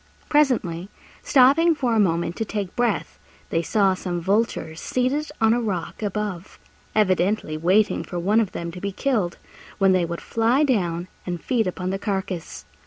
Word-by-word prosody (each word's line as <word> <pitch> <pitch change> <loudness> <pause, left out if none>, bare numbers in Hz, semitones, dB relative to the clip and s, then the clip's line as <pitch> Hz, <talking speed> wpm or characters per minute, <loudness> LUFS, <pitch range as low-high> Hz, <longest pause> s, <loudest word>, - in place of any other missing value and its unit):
Presently, 215 - +1 0.3
stopping 290 +6 +5
for 255 -5 0
a 225 - +3
moment 170 -3 +1
to - - 0
take 205 -3 -4
breath, 240 -3 -1 0.3
they 165 - +1
saw 195 +2 +2
some 180 -1 -3
vultures 190 -4 -1
seated 265 +4 -1
on 225 0 +4
a 240 - +1
rock 195 -5 -3
above 205 -3 -4 0.4
evidently 190 -4 +1
waiting 185 +7 +2
for 175 - -6
one 200 +6 +2
of 215 -5 0
them 170 0 -5
to 180 +1 -9
be 200 - -2
killed, 210 -6 -1 0.4
when 195 -1 +4
they 185 -2 +3
would 170 0 -5
fly 230 +6 +1
down 180 - 0 0.2
and 175 -1 -3
feed 235 -1 0
upon 185 0 -3
the 195 - -2
carcase. 190 -4 -4
200 Hz, 170 wpm, -23 LUFS, 175-230 Hz, 0.4 s, stopping